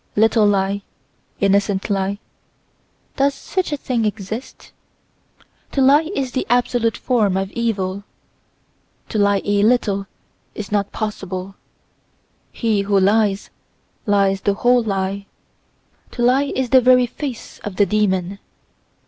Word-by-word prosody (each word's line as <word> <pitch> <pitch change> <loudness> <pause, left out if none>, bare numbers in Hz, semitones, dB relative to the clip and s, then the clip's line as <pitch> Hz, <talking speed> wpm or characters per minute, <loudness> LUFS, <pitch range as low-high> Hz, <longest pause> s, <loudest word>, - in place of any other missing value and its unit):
Little 220 0 +4
lie, 200 0 +1 0.6
innocent 200 0 +1
lie—does 200 +7 -4
such 375 -4 -3
a 295 - -1
thing 250 -4 -1
exist? 215 +3 -5 1.0
To 275 - +1
lie 290 +5 +5
is 265 -2 -2
the 260 - -2
absolute 240 -2 +1
form 215 -7 +1
of 195 0 -2
evil. 200 -4 -2 1.1
To 215 - -1
lie 200 -1 +2
a 205 0 +2
little 205 -3 +2 0.5
is 210 -2 -6
not 205 -1 0
possible: 195 -3 -5 1.0
he 220 -4 0
who 200 0 +2
lies, 200 0 +2 0.6
lies 195 -1 +2
the 200 - +1
whole 245 +3 +3
lie. 200 -2 -2 0.9
To 240 - -2
lie 270 +3 +3
is 260 -2 -1
the 260 - +7
very 250 0 +5
face 255 0 -7
of 205 -3 -7
the 205 - +4
demon. 195 -1 0
210 Hz, 125 wpm, -20 LUFS, 195-245 Hz, 1.1 s, the